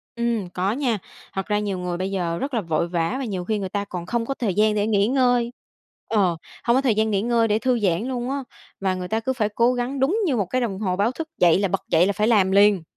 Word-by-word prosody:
Ừm, 235 -5 -1
có 180 +3 -1
nha. 245 -2 0 0.4
Thật 195 -1 -3
ra 210 -1 0
nhiều 200 -3 -2
người 180 -1 -3
bây 190 +2 -3
giờ 175 -3 -1
rất 275 +9 -4
là 230 - +1
vội 165 -2 -1
vã 170 +4 -1
và 270 - -3
nhiều 190 -5 -4
khi 215 +2 -1
người 190 -2 -4
ta 200 +1 -2
còn 180 -3 -6
không 235 +4 -1
có 275 - -2
thời 230 -7 -2
gian 210 +2 +3
để 205 0 +1
nghỉ 205 -2 +2
ngơi. 245 -2 +2 0.6
Ờ, 190 -6 +2 0.3
không 235 - +3
có 265 - +3
thời 250 -6 +2
gian 220 0 +1
nghỉ 195 -1 +1
ngơi 230 0 +2
để 210 0 +1
thư 250 0 +1
giãn 185 -2 +1
luôn 250 -1 -3
á, 275 0 -2 0.4
và 190 -1 0
người 180 -1 -5
ta 220 +4 0
cứ 260 +4 -1
phải 220 -5 0
cố 235 +4 +2
gắng 250 +2 -2
đúng 310 +12 +2
như 295 -8 +1
một 205 -4 0
cái 255 +8 -1
đồng 200 -6 -2
hồ 190 -4 -1
báo 205 +5 +1
thức, 315 +5 -6
dậy 175 0 +5
là 200 - +1
bật - - -1
dậy 165 +2 +4
là 200 - +1
phải 210 +3 +1
làm 200 -5 +4
liền. 200 -2 +5
210 Hz, 280 wpm, -23 LUFS, 190-240 Hz, 0.6 s, dậy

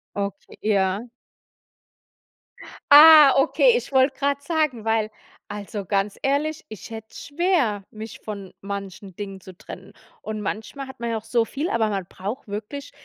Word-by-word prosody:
Okay, 200 -1 -5
ja. 200 +2 +1 1.8
Ah, 300 -1 +10
okay, 475 - +4
ich 480 - -3
wollte 265 0 +3
grad 280 0 0
sagen, 290 -8 -1
weil 220 -1 +1 0.4
also, 205 0 -6
ganz 195 +1 -1
ehrlich, 290 +3 -1
ich 215 0 -10
hätte 220 -1 -8
es - - -10
schwer, 285 - +1
mich 220 0 -9
von 200 -3 -8
manchen 200 -1 -7
Dingen 195 -1 -7
zu 185 - -12
trennen 190 +2 -11 0.3
und 215 0 -5
manchmal 225 +7 -5
hat 265 -1 -12
man 235 - -2
ja 225 - -1
auch 220 - -8
so 230 0 +2
viel, 290 +9 -3
aber 220 -2 +1
man 195 -3 -3
braucht 205 +9 -7
wirklich 220 +8 -6
220 Hz, 155 wpm, -23 LUFS, 205-280 Hz, 1.8 s, Ah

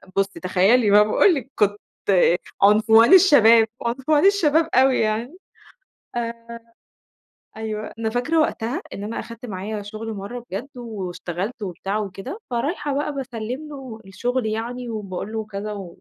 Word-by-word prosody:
بُصي 195 0 -1
تخيّلي 200 +5 +3
بقى 210 +1 +7
باقول 280 - +4
لِك 270 -1 -6
كنت 205 0 +1 0.8
عنفوان 220 - +6
الشباب، 235 - +7 0.2
عنفوان 270 +7 +1
الشباب 330 -5 +3
أوي 260 +1 +4
يعني. 225 +9 -1 0.8
آآ، 235 0 -5 1.0
أيوه 215 -1 -5
أنا 225 -1 -1
فاكرة 250 +8 0
وقتها 265 +1 -1
إن 200 - -6
أنا 215 +2 -4
أخدت 230 +2 -9
معايا 205 0 -5
شغل 215 +2 -6
مَرّة 215 +4 -7
بجد 200 +8 -4
واشتغلت 200 -1 -5
وبتاع 195 +2 -3
وكده، 195 - -6
فرايحة 285 +4 -2
بقى 295 +1 -2
باسلّم 255 +2 -5
له 265 -6 -9
الشغل 245 +6 -2
يعني 235 +3 -4
وباقول 210 -1 -5
له 220 -1 -3
كذا 205 -1 -6
225 Hz, 135 wpm, -22 LUFS, 210-255 Hz, 1.0 s, بقى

